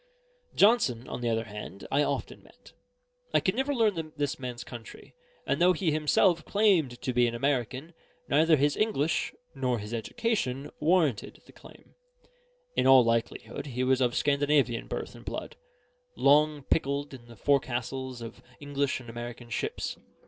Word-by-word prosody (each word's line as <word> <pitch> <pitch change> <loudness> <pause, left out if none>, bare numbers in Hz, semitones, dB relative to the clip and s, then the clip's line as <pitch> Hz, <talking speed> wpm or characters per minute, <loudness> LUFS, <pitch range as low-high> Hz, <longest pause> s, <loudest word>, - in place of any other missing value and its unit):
Johnson, 165 - +3
on - - -5
the 120 - 0
other 115 0 0
hand, 105 -3 -9
I 140 - +3
often - - -2
met. - - -19 0.6
I - - +7
could 185 - 0
never 265 +5 -1
learn 205 - 0
this 145 -1 -2
man's 125 -2 -5
country; 120 -2 -11 0.3
and - - 0
though 180 +1 +6
he 170 -1 0
himself 155 +3 +3
claimed 180 - +2
to 130 - -1
be 120 0 +4
American, 130 +5 -2 0.3
neither 160 +3 +4
his 145 0 +2
English 170 -8 0 0.2
nor 130 -4 -1
his 105 +1 -7
education 135 - -2
warranted 155 - +1
the - - -16
claim. - - -17 0.8
In - - +2
all 130 -1 +8
likelihood 115 +4 -2
he 125 -1 -2
was 130 0 +2
of 125 -1 +1
Scandinavian 140 -4 +1
birth - - -5
and - - -13
blood, - - -6 0.6
long 150 +1 +4
pickled 140 0 -1
in 120 -3 -11
the 120 - -13
forecastles 130 0 -1
of 115 - -9 0.2
English 140 -2 -1
and 125 - -13
American 120 +1 -8
ships. 110 - -3
135 Hz, 155 wpm, -28 LUFS, 120-155 Hz, 0.8 s, all